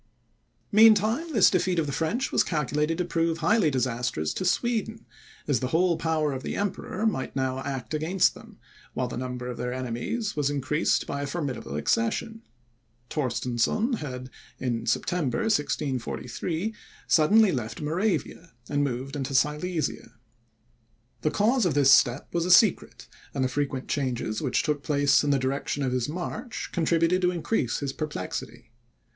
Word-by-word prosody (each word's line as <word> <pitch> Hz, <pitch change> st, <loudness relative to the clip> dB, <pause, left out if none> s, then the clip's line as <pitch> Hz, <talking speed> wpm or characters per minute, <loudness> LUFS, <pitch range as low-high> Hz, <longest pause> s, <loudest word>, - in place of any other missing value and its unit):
Meantime, 220 Hz, -, +5 dB
this -, -, +5 dB
defeat 185 Hz, -1 st, +1 dB
of 165 Hz, -, +2 dB
the 140 Hz, -, -3 dB
French 165 Hz, -, -1 dB
was -, -, +3 dB
calculated 150 Hz, 0 st, -1 dB
to 180 Hz, -, -1 dB
prove 165 Hz, -1 st, 0 dB
highly 210 Hz, -3 st, +3 dB
disastrous 125 Hz, -, -1 dB
to -, -, -3 dB
Sweden, 225 Hz, +3 st, -1 dB, 0.4 s
as 140 Hz, -6 st, +2 dB
the 130 Hz, -, -2 dB
whole 170 Hz, +5 st, +2 dB
power 160 Hz, -2 st, 0 dB
of 130 Hz, -, -4 dB
the -, -, -4 dB
Emperor 200 Hz, +1 st, -2 dB
might 195 Hz, -12 st, -1 dB
now 130 Hz, -1 st, -1 dB
act 135 Hz, 0 st, -5 dB
against 165 Hz, +5 st, +2 dB
them, -, -, -14 dB, 0.4 s
while 130 Hz, -, -1 dB
the 125 Hz, -, -6 dB
number 125 Hz, 0 st, -4 dB
of 125 Hz, -, -5 dB
their 125 Hz, 0 st, -3 dB
enemies 130 Hz, -, -3 dB
was 145 Hz, -2 st, +1 dB
increased 145 Hz, +2 st, 0 dB
by 140 Hz, -, -4 dB
a 145 Hz, -, -3 dB
formidable 140 Hz, -, -4 dB
accession. 115 Hz, -, -1 dB, 0.7 s
Torstensohn 130 Hz, -, 0 dB
had, 130 Hz, -5 st, -6 dB, 0.3 s
in 120 Hz, -3 st, -2 dB
September, 130 Hz, 0 st, 0 dB
1643, 150 Hz, -, -2 dB, 0.3 s
suddenly 200 Hz, +6 st, +5 dB
left 120 Hz, -6 st, -4 dB
Moravia, 170 Hz, +1 st, -2 dB
and 145 Hz, 0 st, 0 dB
moved 135 Hz, +1 st, -3 dB
into 135 Hz, -1 st, -3 dB
Silesia. 150 Hz, +4 st, -1 dB, 1.1 s
The 155 Hz, -, +1 dB
cause 230 Hz, -, +2 dB
of 155 Hz, -, -1 dB
this 140 Hz, -1 st, +6 dB
step 125 Hz, 0 st, +3 dB
was 170 Hz, 0 st, 0 dB
a -, -, -2 dB
secret, 185 Hz, +2 st, +4 dB, 0.3 s
and 135 Hz, -, +1 dB
the -, -, +2 dB
frequent 135 Hz, 0 st, -2 dB
changes 125 Hz, -6 st, -2 dB
which 130 Hz, -5 st, 0 dB
took 150 Hz, -2 st, -1 dB
place 145 Hz, -1 st, +3 dB
in 145 Hz, -, 0 dB
the 140 Hz, -, +3 dB
direction 135 Hz, +2 st, -2 dB
of 130 Hz, -, 0 dB
his 125 Hz, +1 st, -1 dB
march, 185 Hz, +8 st, -5 dB
contributed 170 Hz, +1 st, +2 dB
to 180 Hz, -, +3 dB
increase 170 Hz, -, -1 dB
this 140 Hz, -1 st, -2 dB
perplexity. 150 Hz, -, -5 dB
150 Hz, 155 wpm, -26 LUFS, 130-180 Hz, 1.1 s, this